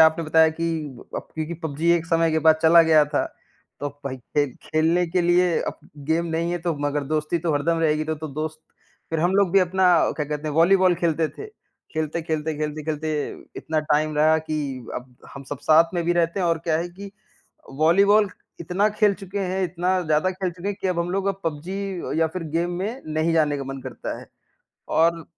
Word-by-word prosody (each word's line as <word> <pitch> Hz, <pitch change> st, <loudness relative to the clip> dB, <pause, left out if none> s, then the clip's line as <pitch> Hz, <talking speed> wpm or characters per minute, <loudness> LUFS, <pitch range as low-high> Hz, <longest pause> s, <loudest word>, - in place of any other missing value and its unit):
आपने 160 Hz, +1 st, +5 dB
बताया 160 Hz, +1 st, +5 dB
कि 165 Hz, +1 st, -2 dB, 0.5 s
अप -, -, -6 dB
क्योंकि 160 Hz, +2 st, -3 dB
पबजी 160 Hz, +2 st, 0 dB
एक 170 Hz, -1 st, 0 dB
समय 165 Hz, -1 st, +2 dB
के 160 Hz, -, +2 dB
बाद 160 Hz, 0 st, +7 dB
चला 165 Hz, +1 st, +7 dB
गया 155 Hz, -2 st, +5 dB
था, 145 Hz, 0 st, -1 dB, 0.6 s
तो 145 Hz, -, -2 dB, 0.2 s
भई 130 Hz, -1 st, -4 dB
खेल 140 Hz, +1 st, -2 dB
खेलने 165 Hz, +3 st, +1 dB
के 180 Hz, +2 st, 0 dB
लिए 175 Hz, 0 st, +3 dB
अब -, -, -4 dB, 0.3 s
गेम 165 Hz, +2 st, +1 dB
नहीं 165 Hz, +1 st, -1 dB
है 175 Hz, -, -1 dB
तो 170 Hz, -1 st, -2 dB
मगर 145 Hz, 0 st, -1 dB
दोस्ती 155 Hz, +3 st, -1 dB
तो 165 Hz, -1 st, -1 dB
हरदम 165 Hz, +3 st, +1 dB
रहेगी, 155 Hz, -1 st, +1 dB
तो 155 Hz, 0 st, -2 dB
तो 155 Hz, +1 st, -7 dB
दोस्त 155 Hz, +2 st, -5 dB, 0.5 s
फिर 165 Hz, -1 st, -1 dB
हम 175 Hz, +3 st, +2 dB
लोग 200 Hz, -3 st, +3 dB
भी 195 Hz, -, +6 dB
अपना 185 Hz, +1 st, +1 dB, 0.3 s
क्या 150 Hz, -, -3 dB
कहते 150 Hz, +1 st, -4 dB
हैं 150 Hz, -, -4 dB
वॉलीबॉल 185 Hz, +2 st, +5 dB
खेलते 165 Hz, -2 st, +1 dB
थे, 425 Hz, -, -9 dB, 0.5 s
खेलते-खेलते, 155 Hz, 0 st, -2 dB
खेलते-खेलते 155 Hz, +1 st, -3 dB, 0.4 s
इतना 155 Hz, -1 st, -1 dB
टाइम 150 Hz, 0 st, +1 dB
रहा 155 Hz, +1 st, +4 dB
कि 155 Hz, 0 st, -4 dB, 0.4 s
अब 125 Hz, 0 st, -7 dB, 0.2 s
हम 140 Hz, -, -8 dB
सब 145 Hz, -, -4 dB
साथ 165 Hz, +3 st, +5 dB
में 175 Hz, -, 0 dB
भी 175 Hz, -, +2 dB
रहते 170 Hz, +2 st, +1 dB
हैं। 180 Hz, -, +1 dB
और 165 Hz, -1 st, +1 dB
क्या 160 Hz, -2 st, +2 dB
है 175 Hz, +2 st, -3 dB
कि 195 Hz, +3 st, -10 dB
अ, -, -, -10 dB, 0.7 s
वॉलीबॉल 200 Hz, +6 st, +5 dB, 0.3 s
इतना 185 Hz, +5 st, +1 dB
खेल 210 Hz, -1 st, +2 dB
चुके 195 Hz, +1 st, -5 dB
हैं, 190 Hz, 0 st, -1 dB
इतना 180 Hz, +1 st, 0 dB
ज़्यादा 155 Hz, +3 st, +1 dB
खेल 185 Hz, 0 st, -3 dB
चुके 175 Hz, +3 st, -6 dB
हैं 205 Hz, -, -3 dB
कि -, -, -1 dB
अब 175 Hz, -2 st, -1 dB
हम 170 Hz, +1 st, -1 dB
लोग 195 Hz, +1 st, -1 dB
अब 195 Hz, 0 st, -1 dB
पबजी 165 Hz, +4 st, -3 dB, 0.5 s
या 160 Hz, -, +4 dB
फिर 185 Hz, -, -3 dB
गेम 175 Hz, +1 st, 0 dB
में 220 Hz, +8 st, -4 dB
नहीं 160 Hz, +2 st, +1 dB
जाने 150 Hz, -3 st, +2 dB
का 140 Hz, -, -5 dB
मन 135 Hz, 0 st, -6 dB
करता -, -, -6 dB
है। -, -, -12 dB, 0.7 s
और 165 Hz, 0 st, +3 dB
165 Hz, 210 wpm, -23 LUFS, 155-175 Hz, 0.7 s, बाद